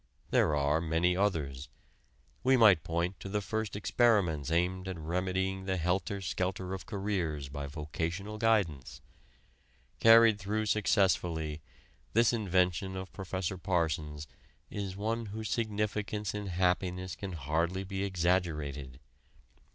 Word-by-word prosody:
There 75 - +3
are 75 +2 +2
many 85 +2 +1
others. 75 -9 -1 0.7
We 130 0 +5
might 105 -8 +7
point 85 +2 -2
to 95 - -7
the 105 +1 0
first 110 +1 -3
experiments 100 - +2
aimed 90 +3 0
at 95 -2 -4
remedying 95 +3 -2
the 95 -1 0
helter 90 +3 -1
skelter 90 +1 -2
of 95 - -6
careers 90 -9 -2
by 70 0 -5
vocational 85 +8 -4
guidance. 100 - +1 1.0
Carried 115 -2 +7
through 105 +3 -1
successfully, 90 -7 +1 0.5
this 115 +2 +4
invention 95 -3 +1
of 95 0 -6
Prof. 95 -1 -4
Parsons' 80 -5 -1 0.5
is 100 -2 -4
one 115 +2 -2
whose 110 +2 -5
significance 105 -2 -1
in 105 -1 -4
happiness 90 0 0
can 95 -2 -6
hardly 85 +5 -1
be 95 0 -3
exaggerated. 80 -8 -1
95 Hz, 120 wpm, -31 LUFS, 80-100 Hz, 1.0 s, might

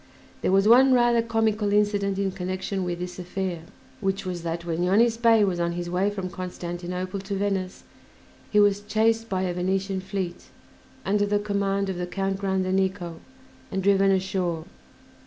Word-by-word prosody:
There - - +1
was 195 +2 +4
one 260 +3 +7
rather 240 -1 +4
comical 220 -2 0
incident 205 -1 +1
in 195 -1 0
connection 185 +1 -3
with 175 -1 -2
this 180 +1 -6
affair, 180 -1 -3 0.4
which 195 -1 -1
was 180 -2 -4
that 170 0 -4
when 170 0 -2
Yonis 220 +6 +3
Bey 225 -2 +5
was 185 -3 0
on 170 0 0
his 175 0 -4
way 185 +3 +1
from 195 -3 -4
Constantinople 180 +1 -5
to 200 +1 -4
Venice 195 -2 -2 0.7
he 210 - +3
was 205 -1 +4
chased 225 +2 +1
by 190 -1 0
a 180 -1 -1
Venetian 190 +2 -1
fleet, 190 -2 -4 0.6
under 205 +1 +2
the 205 0 +2
command 200 -1 -1
of 190 -2 -3
the 180 0 -3
Count 195 +1 -2
Grandenico, 190 -2 -1 0.5
and 190 0 -2
driven 195 0 +4
ashore. 185 -4 0
195 Hz, 165 wpm, -25 LUFS, 180-205 Hz, 0.7 s, one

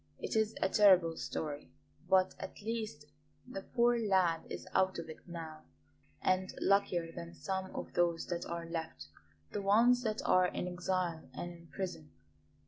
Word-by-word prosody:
It - - -4
is 220 0 +2
a - - +4
terrible 185 -5 +5
story, 150 -2 -4 0.4
but 190 -1 +4
at - - -7
least 215 -9 -3 0.4
the 225 -6 -5
poor 240 +2 +2
lad 185 -6 +2
is - - -6
out 190 0 +3
of 165 -1 -5
it 160 - -14
now, 160 -3 -7 0.6
and 185 0 +2
luckier 185 -4 +2
than 170 +1 -8
some 190 -1 -3
of - - -5
those 170 -1 +2
that 175 -1 -2
are 170 0 -4
left 160 - -5 0.4
the 205 - -2
ones 230 +5 +5
that 220 -2 -2
are 185 0 +5
in 180 - -3
exile 180 -2 -2
and 175 - -4
in 170 -1 -14
prison. 160 - -5
185 Hz, 160 wpm, -34 LUFS, 165-200 Hz, 0.6 s, terrible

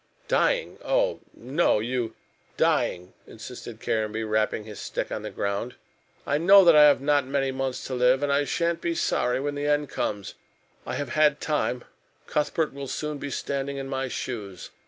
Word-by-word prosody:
"Dying - - +1
oh, - - +1
no, 135 +6 +1
you 120 0 -2 0.2
" - - -36
"Dying," 90 +1 -1
insisted 115 0 -9
Caranby, 110 0 -1
rapping 110 0 0
his 105 -1 -10
stick - - -4
on - - -3
the - - -5
ground. 100 +5 -3 0.5
"I 145 - +1
know 195 +3 +7
that 170 -2 +7
I 150 0 +9
have 145 -2 +5
not 145 -1 +2
many 135 -1 0
months 130 -1 -3
to 130 - -5
live, 125 +2 +3
and 140 -1 +1
I 145 +1 +3
sha'n't 170 +4 -1
be 170 -1 -1
sorry 125 -6 +1
when 145 +1 -2
the 145 0 -3
end 145 -1 +1
comes. 100 -2 -3 0.5
I - - -3
have 145 -3 -3
had 150 +2 +4
a - - -22
hard - - -31
time. 135 -5 -1 0.4
Cuthbert 150 +1 -1
will 140 0 -6
soon 150 +2 -4
be 145 - -5
standing 140 0 -3
in 135 0 -5
my 135 -1 -2
shoes. 105 -8 -6
135 Hz, 190 wpm, -26 LUFS, 120-150 Hz, 0.5 s, I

